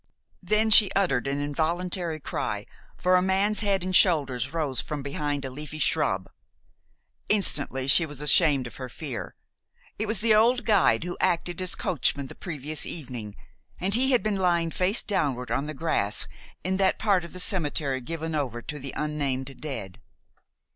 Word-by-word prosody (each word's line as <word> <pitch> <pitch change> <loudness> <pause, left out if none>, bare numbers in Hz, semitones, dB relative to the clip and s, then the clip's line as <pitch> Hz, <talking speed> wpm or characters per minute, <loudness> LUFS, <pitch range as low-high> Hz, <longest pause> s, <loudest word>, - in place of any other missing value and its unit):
Then 215 +4 +1
she 205 -2 +8
uttered 140 -11 +1
an 140 +1 -1
involuntary 165 +3 -2
cry, - - -4 0.3
for 180 +1 +2
a 180 - +4
man's 195 +3 +2
head 200 -3 +1
and 185 0 -2
shoulders 140 - +3
rose 150 -7 -1
from 150 -2 -5
behind 145 0 -3
a 130 - -6
leafy 150 +3 -7
shrub. - - 0 1.0
Instantly 145 -10 +2
she 160 +4 +5
was 145 -2 -9
ashamed 150 -2 +5
of 120 - -10
her 130 -1 -7
fear. 135 -2 -6 0.6
It 215 - -2
was 220 0 +2
the 225 0 +3
old 235 +2 +3
guide 190 - +3
who 175 0 -5
acted 175 +1 0
as 185 - +1
coachman 140 -4 -1
the - - -10
previous 155 -3 -4
evening, 120 -9 -5 0.4
and 190 +2 -1
he 260 +4 +3
had 250 - +3
been 215 -2 -1
lying 170 -3 +1
face 185 +6 0
downward 135 - -2
on 145 - -1
the 155 - -6
grass 135 -9 0 0.4
in 190 +1 -1
that 190 -1 +2
part 200 -5 +1
of 170 - -10
the 185 - -7
cemetery 150 -8 +1
given 160 +4 -5
over 125 -6 -3
to 150 - -6
the 135 0 -6
unnamed 135 -3 -3
dead. 115 -11 -6
160 Hz, 170 wpm, -26 LUFS, 140-185 Hz, 1.0 s, she